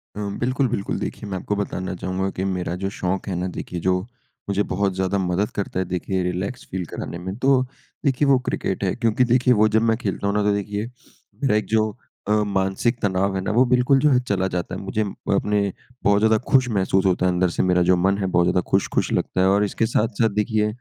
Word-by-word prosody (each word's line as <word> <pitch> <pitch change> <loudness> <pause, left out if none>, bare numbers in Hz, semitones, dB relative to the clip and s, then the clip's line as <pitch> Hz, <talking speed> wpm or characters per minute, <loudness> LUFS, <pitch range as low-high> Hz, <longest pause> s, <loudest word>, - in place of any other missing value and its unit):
अ, - - -6 0.2
बिल्कुल, 130 +2 +1
बिल्कुल। 100 -4 -2
देखिए, 105 - -5
मैं 95 - -3
आपको 105 +3 -2
बताना 95 -2 -3
चाहूँगा 95 +2 -2
कि 95 - -1
मेरा 90 -2 -2
जो 95 0 -2
शौक 95 +3 -2
है 95 - -2
ना, 90 +1 -2
देखिए, 90 - -5
जो 90 +2 +1 0.5
मुझे 100 +1 +1
बहुत 100 0 +1
ज़्यादा 95 +1 0
मदद 95 +2 0
करता 100 -2 -2
है, 95 - 0
देखिए, 90 +1 -2
रिलैक्स 90 +6 -3
फ़ील 95 -1 -3
कराने 85 - -6
में, 95 +2 -5
तो 130 0 +3 0.4
देखिए 140 +1 +2
वो 135 -1 +6
क्रिकेट 95 - -2
है, 95 - +1
क्योंकि 115 +1 +2
देखिए, 125 +1 +3
वो 110 -1 +4
जब 110 - +5
मैं 110 - +2
खेलता 100 -3 -3
हूँ 100 - 0
ना, 105 - +2
तो 105 0 +2
देखिए, 100 +1 -2 0.6
मेरा 130 -6 +3
एक 105 - +1
जो 110 -1 +1 0.3
अ, - - 0 0.2
मानसिक 95 +5 0
तनाव 95 -1 +1
है 95 - -1
ना, 95 - -2
वो 120 +4 +5
बिल्कुल 125 +2 +3
जो 150 - +4
है 125 - +5
चला 95 -1 +1
जाता 90 -1 -3
है। - - -6
मुझे 100 +3 -2 0.3
अपने 105 +1 +1 0.4
बहुत 100 0 +4
ज़्यादा 110 0 +4
खुश 130 -2 +4
महसूस 95 -2 +1
होता 90 -1 +2
है 90 - +3
अंदर 90 0 +1
से, - - -1
मेरा 90 -1 +3
जो 90 +1 +4
मन 95 +2 +2
है, 100 - -2
बहुत 90 -1 +2
ज़्यादा 90 +1 +2
खुश-खुश - - +1
लगता 95 - 0
है 95 - +4
और 100 +1 +3
इसके 110 +2 -1
साथ-साथ 110 +1 +1
देखिए, 105 0 +1
100 Hz, 230 wpm, -22 LUFS, 95-110 Hz, 0.6 s, वो